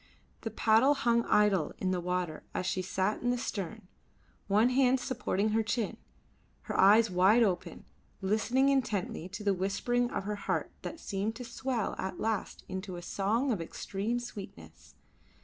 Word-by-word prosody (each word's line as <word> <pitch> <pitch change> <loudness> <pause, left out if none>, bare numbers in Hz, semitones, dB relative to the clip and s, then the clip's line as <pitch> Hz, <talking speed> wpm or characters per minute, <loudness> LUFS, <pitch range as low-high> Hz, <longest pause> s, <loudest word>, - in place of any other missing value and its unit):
The 225 - -3
paddle 225 +6 +4
hung 235 -3 +2
idle 200 -6 +3
in 185 - -1
the 180 -1 -1
water 180 -3 -2
as - - -1
she 185 0 0
sat 190 +3 -1
in 245 - 0
the 245 - +1
stern, 195 -6 -5 0.6
one 210 +4 +4
hand 260 0 +4
supporting 220 -5 -1
her 220 +1 +2
chin, 220 0 -2 0.7
her - - -5
eyes 210 +2 +6
wide 190 +6 +5
open, 185 -5 -2 0.3
listening 220 +7 +2
intently 210 - -1
to 205 +3 -7
the 200 -1 +3
whispering 220 +6 0
of - - -3
her 210 +1 -3
heart - - -2
that 330 - -6
seemed 205 -1 -3
to 250 +1 -7
swell 235 -2 -2
at 190 - -4
last 220 -2 -2
into 190 0 -5
a 175 - -8
song 220 +9 0
of 205 -7 -1
extreme 205 +7 -3
sweetness. 85 - -10
210 Hz, 165 wpm, -31 LUFS, 190-235 Hz, 0.7 s, eyes